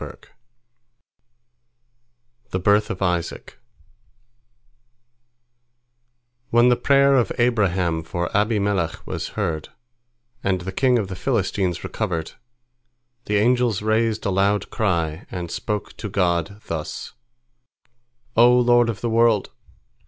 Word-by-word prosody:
THE -, -, -2 dB
BIRTH 105 Hz, +3 st, +3 dB
OF 95 Hz, -, -3 dB
ISAAC 90 Hz, -2 st, -3 dB, 2.9 s
When 120 Hz, +1 st, +5 dB
the 125 Hz, -, +4 dB
prayer 140 Hz, +2 st, +4 dB
of 125 Hz, -3 st, +2 dB
Abraham 95 Hz, -9 st, +1 dB
for 85 Hz, +3 st, -4 dB
Abimelech 100 Hz, -5 st, 0 dB
was -, -, -4 dB
heard, 85 Hz, -7 st, -2 dB, 0.7 s
and 95 Hz, -2 st, 0 dB
the 95 Hz, +2 st, -5 dB
king 125 Hz, +5 st, +2 dB
of 105 Hz, -4 st, -1 dB
the 95 Hz, -, -6 dB
Philistines 95 Hz, -5 st, -1 dB
recovered, 85 Hz, -7 st, -3 dB, 0.9 s
the 105 Hz, -, 0 dB
angels 120 Hz, -1 st, +2 dB
raised 110 Hz, 0 st, 0 dB
a 100 Hz, -, +1 dB
loud 100 Hz, +1 st, +1 dB
cry, 85 Hz, -5 st, -1 dB
and 90 Hz, -3 st, -5 dB
spoke 105 Hz, -1 st, -4 dB
to 105 Hz, -, -5 dB
God 90 Hz, +1 st, 0 dB
thus: 80 Hz, -2 st, -5 dB, 1.2 s
"O 120 Hz, +2 st, +6 dB
Lord 120 Hz, -1 st, +4 dB
of 110 Hz, -, -4 dB
the 120 Hz, -, -1 dB
world! 115 Hz, -2 st, +3 dB
105 Hz, 110 wpm, -22 LUFS, 90-115 Hz, 2.9 s, O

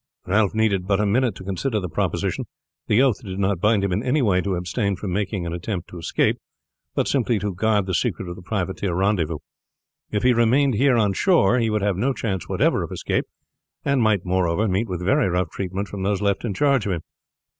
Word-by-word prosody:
Ralph 105 Hz, +2 st, +2 dB
needed 100 Hz, -4 st, +1 dB
but 100 Hz, 0 st, +2 dB
a 105 Hz, -, +2 dB
minute 115 Hz, +1 st, +1 dB
to -, -, -10 dB
consider 105 Hz, +5 st, -1 dB
the 90 Hz, -, -4 dB
proposal. 80 Hz, -, -2 dB, 0.4 s
The 110 Hz, +5 st, +4 dB
oath 125 Hz, -6 st, +1 dB
did 95 Hz, -3 st, -6 dB
not 100 Hz, -2 st, 0 dB
bind 105 Hz, -1 st, +3 dB
him 100 Hz, -, 0 dB
in 95 Hz, +4 st, 0 dB
any 130 Hz, +3 st, +1 dB
way 95 Hz, -5 st, +3 dB
to 95 Hz, -1 st, -1 dB
abstain 95 Hz, +4 st, -1 dB
from 95 Hz, 0 st, -4 dB
making 100 Hz, -2 st, -2 dB
an 85 Hz, -, -3 dB
attempt 90 Hz, +1 st, -4 dB
to 90 Hz, -, -9 dB
escape, 85 Hz, -, 0 dB, 0.6 s
but -, -, +1 dB
simply 120 Hz, -4 st, +1 dB
to 100 Hz, 0 st, -2 dB
guard 105 Hz, +1 st, +1 dB
the 95 Hz, -, -3 dB
secret 95 Hz, -3 st, -1 dB
of 85 Hz, -, -6 dB
the -, -, -11 dB
privateer 95 Hz, -1 st, -2 dB
rendezvous. 90 Hz, -5 st, +1 dB, 0.7 s
If 105 Hz, -, -1 dB
he 125 Hz, 0 st, +5 dB
remained 125 Hz, +4 st, +3 dB
here 125 Hz, +3 st, +3 dB
on 105 Hz, -3 st, +2 dB
shore 125 Hz, -, +3 dB
he 115 Hz, -1 st, +1 dB
would 105 Hz, -2 st, 0 dB
have 100 Hz, -3 st, +1 dB
no 130 Hz, +7 st, +1 dB
chance 95 Hz, -8 st, -3 dB
whatever -, -, +2 dB
of -, -, -5 dB
escape, -, -, -1 dB, 0.6 s
and 140 Hz, -2 st, +2 dB
might 105 Hz, -5 st, +2 dB
moreover 95 Hz, +3 st, +1 dB
meet 100 Hz, +4 st, 0 dB
with 90 Hz, -1 st, -4 dB
very 135 Hz, 0 st, +3 dB
rough 90 Hz, -2 st, -1 dB
treatment 95 Hz, +1 st, -4 dB
from 100 Hz, -1 st, -7 dB
those 100 Hz, 0 st, 0 dB
left 100 Hz, -1 st, 0 dB
in 110 Hz, -5 st, -2 dB
charge 135 Hz, -3 st, +2 dB
of 95 Hz, -, 0 dB
him. 85 Hz, -, -3 dB
100 Hz, 220 wpm, -23 LUFS, 95-115 Hz, 0.7 s, he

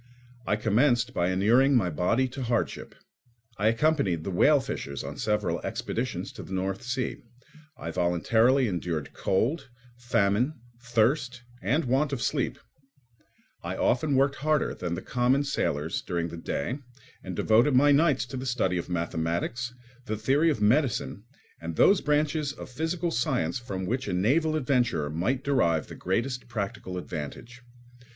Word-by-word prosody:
I 105 Hz, -, +2 dB
commenced 115 Hz, +3 st, +2 dB
by 85 Hz, +1 st, +1 dB
inuring 120 Hz, +9 st, +4 dB
my 95 Hz, -8 st, +2 dB
body 115 Hz, -, +1 dB
to 130 Hz, +2 st, -7 dB
hardship. 120 Hz, -2 st, -2 dB, 0.6 s
I 105 Hz, -, +2 dB
accompanied 115 Hz, -, +2 dB
the 95 Hz, -, -3 dB
whale 145 Hz, +11 st, +5 dB
fishers 70 Hz, -, -5 dB
on -, -, -7 dB
several 105 Hz, -6 st, 0 dB
expeditions -, -, -3 dB
to -, -, -9 dB
the 95 Hz, -, -8 dB
North 95 Hz, +1 st, -2 dB
Sea; 125 Hz, 0 st, -2 dB, 0.6 s
I -, -, -5 dB
voluntarily 110 Hz, +9 st, +2 dB
endured 85 Hz, -6 st, -3 dB
cold, 130 Hz, -, 0 dB, 0.3 s
famine, 120 Hz, +3 st, +1 dB, 0.3 s
thirst, 125 Hz, +1 st, +1 dB, 0.2 s
and 140 Hz, -, +1 dB
want 135 Hz, +4 st, +1 dB
of 135 Hz, -, -2 dB
sleep; -, -, -1 dB, 1.0 s
I -, -, -4 dB
often 140 Hz, +3 st, +1 dB
worked 140 Hz, +1 st, +2 dB
harder 155 Hz, +1 st, +1 dB
than 85 Hz, -1 st, -3 dB
the -, -, -6 dB
common 125 Hz, +3 st, +2 dB
sailors 80 Hz, -, -1 dB
during 85 Hz, -1 st, -2 dB
the 85 Hz, -, -7 dB
day 100 Hz, -, -3 dB, 0.4 s
and -, -, -6 dB
devoted 120 Hz, +5 st, +3 dB
my 145 Hz, +3 st, +6 dB
nights 145 Hz, -5 st, +3 dB
to 130 Hz, +1 st, -7 dB
the 130 Hz, +1 st, -4 dB
study 100 Hz, -8 st, 0 dB
of 85 Hz, -, -6 dB
mathematics, 85 Hz, +8 st, -2 dB, 0.4 s
the 110 Hz, -, -2 dB
theory 140 Hz, +9 st, +2 dB
of 145 Hz, -, 0 dB
medicine, 115 Hz, -1 st, +1 dB, 0.4 s
and 85 Hz, 0 st, -5 dB
those 195 Hz, -, +5 dB
branches 150 Hz, 0 st, 0 dB
of 130 Hz, -, -10 dB
physical 165 Hz, +5 st, -2 dB
science 85 Hz, -, 0 dB
from 95 Hz, -6 st, -5 dB
which 130 Hz, +7 st, -2 dB
a -, -, -2 dB
naval 150 Hz, -, +2 dB
adventurer 125 Hz, -, +1 dB
might 120 Hz, -, -1 dB
derive 85 Hz, -, +2 dB
the -, -, -10 dB
greatest 125 Hz, +7 st, -2 dB
practical 100 Hz, -5 st, -4 dB
advantage. 90 Hz, +9 st, -7 dB
120 Hz, 150 wpm, -27 LUFS, 95-135 Hz, 1.0 s, my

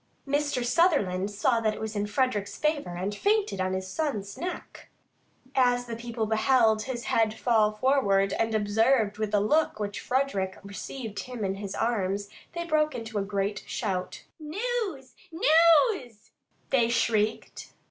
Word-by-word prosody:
Mr. 285 Hz, -3 st, 0 dB
Sutherland 240 Hz, -, +2 dB
saw 230 Hz, +4 st, +1 dB
that 215 Hz, -1 st, 0 dB
it -, -, -9 dB
was 220 Hz, 0 st, -5 dB
in 205 Hz, 0 st, -1 dB
Frederick's 210 Hz, -3 st, -1 dB
favour 295 Hz, -, -1 dB
and 190 Hz, +4 st, -3 dB
fainted 405 Hz, -, +1 dB
on 185 Hz, 0 st, -1 dB
his 190 Hz, 0 st, -3 dB
son's 210 Hz, -5 st, -3 dB
neck. 355 Hz, +1 st, -7 dB, 0.6 s
As 245 Hz, -1 st, +2 dB
the 235 Hz, -1 st, -5 dB
people 230 Hz, -1 st, -3 dB
beheld 220 Hz, 0 st, +3 dB
his 240 Hz, 0 st, -5 dB
head 220 Hz, -1 st, +1 dB
fall 220 Hz, -3 st, +2 dB
forward, 210 Hz, -5 st, +2 dB
and 225 Hz, -1 st, 0 dB
observed 215 Hz, +1 st, +2 dB
the 205 Hz, 0 st, +2 dB
look 215 Hz, +3 st, +1 dB
with 205 Hz, -1 st, -1 dB
which 205 Hz, -, -7 dB
Frederick 225 Hz, -8 st, -1 dB
received 210 Hz, +2 st, -7 dB
him 245 Hz, -5 st, -5 dB
in 190 Hz, -, -1 dB
his 195 Hz, 0 st, -6 dB
arms, 200 Hz, -3 st, -1 dB, 0.2 s
they 340 Hz, 0 st, -4 dB
broke 310 Hz, -2 st, +1 dB
into 225 Hz, -2 st, -4 dB
a -, -, -1 dB
great 200 Hz, 0 st, -2 dB
shout. 185 Hz, -5 st, -3 dB, 0.2 s
"News!" 355 Hz, -, -3 dB, 1.6 s
they 240 Hz, -4 st, +3 dB
shrieked. 220 Hz, -2 st, -1 dB
225 Hz, 145 wpm, -27 LUFS, 205-265 Hz, 1.6 s, beheld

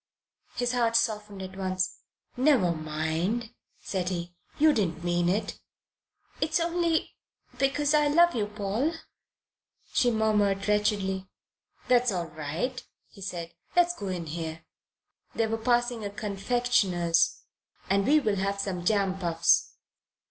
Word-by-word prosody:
His 245 Hz, 0 st, 0 dB
heart 235 Hz, -2 st, +1 dB
softened 210 Hz, -4 st, 0 dB
at 190 Hz, 0 st, -8 dB
once. 185 Hz, -1 st, -2 dB, 0.4 s
"Never 250 Hz, -, +4 dB
mind," 160 Hz, +8 st, -2 dB, 0.3 s
said 185 Hz, -2 st, -2 dB
he. 175 Hz, -1 st, -4 dB, 0.2 s
"You 310 Hz, 0 st, +5 dB
didn't 170 Hz, -, -1 dB
mean 175 Hz, 0 st, +1 dB
it." 205 Hz, +2 st, -1 dB, 0.8 s
"It's 310 Hz, +2 st, +1 dB
only 335 Hz, -1 st, 0 dB, 0.5 s
because 280 Hz, +2 st, +2 dB
I 300 Hz, -1 st, +4 dB
love 345 Hz, +4 st, +5 dB
you, 215 Hz, -3 st, -1 dB
Paul," 210 Hz, +9 st, -1 dB, 1.0 s
she 245 Hz, -, +3 dB
murmured 210 Hz, -3 st, +1 dB
wretchedly. 200 Hz, -2 st, 0 dB, 0.6 s
"That's 245 Hz, -1 st, +4 dB
all 175 Hz, -3 st, -3 dB
right," 165 Hz, -, -4 dB, 0.3 s
he 200 Hz, -, -16 dB
said. 175 Hz, -3 st, -5 dB, 0.2 s
"Let 350 Hz, 0 st, +5 dB
us 350 Hz, -, -2 dB
go 200 Hz, -, -6 dB
in 180 Hz, -3 st, -3 dB
here" 160 Hz, 0 st, -5 dB, 0.7 s
they 225 Hz, -, +2 dB
were 220 Hz, 0 st, -1 dB
passing 240 Hz, -1 st, +1 dB
a 205 Hz, -, -3 dB
confectioner's 200 Hz, -4 st, +1 dB, 0.4 s
"and 195 Hz, +1 st, +2 dB
we'll 275 Hz, -9 st, +3 dB
have 200 Hz, +1 st, -1 dB
some 190 Hz, -3 st, -3 dB
jam 195 Hz, -1 st, +1 dB
puffs." 170 Hz, -3 st, +2 dB
205 Hz, 130 wpm, -28 LUFS, 180-245 Hz, 1.0 s, You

